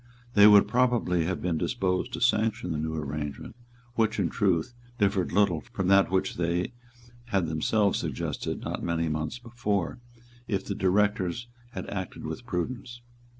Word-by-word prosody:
They 105 0 +8
would 105 -1 +7
probably 120 -8 +2
have 90 +1 -2
been 85 -3 0
disposed 90 -1 -1
to - - -4
sanction 110 -6 +2
the 80 - -1
new 80 +1 -2
arrangement, 75 +2 -5 0.4
which, 115 -2 +1
in 85 -5 +1
truth, 95 +1 +1 0.2
differed 100 -3 +1
little 90 -5 +2
from 95 -1 -1
that 100 0 +5
which 95 0 0
they 85 +5 -1 0.5
had 100 -7 +1
themselves 95 +6 +1
suggested - - -3
not - - -4
many 85 -1 0
months 80 +7 -2
before, 115 -7 -2 0.5
if 100 -2 -1
the 100 - -2
Directors 100 +2 +1 0.3
had - - -5
acted 95 -3 -5
with - - -6
prudence. 120 +6 -4
95 Hz, 150 wpm, -28 LUFS, 85-105 Hz, 0.5 s, They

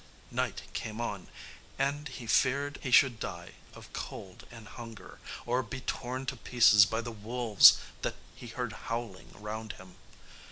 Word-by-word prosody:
Night - - -2
came 110 0 -5
on, 105 -5 -4 0.5
and 140 +2 -1
he 130 -3 -8
feared 140 +5 +1
he 130 - -4
should 125 -2 +5
die - - -6 0.2
of - - -13
cold 95 -2 -8
and 115 -2 -12
hunger, 115 -5 -10 0.3
or 125 +2 +1
be 130 +2 -7
torn 130 +1 -4
to 130 - -3
pieces 115 -5 +6
by 110 +3 -1
the 120 0 -6
wolves 110 0 +6 0.2
that - - -2 0.2
he 120 - -11
heard 120 0 -4 0.2
howling 115 -5 -4
round 110 +1 -6
him. 95 -1 -15
120 Hz, 155 wpm, -30 LUFS, 110-130 Hz, 0.5 s, pieces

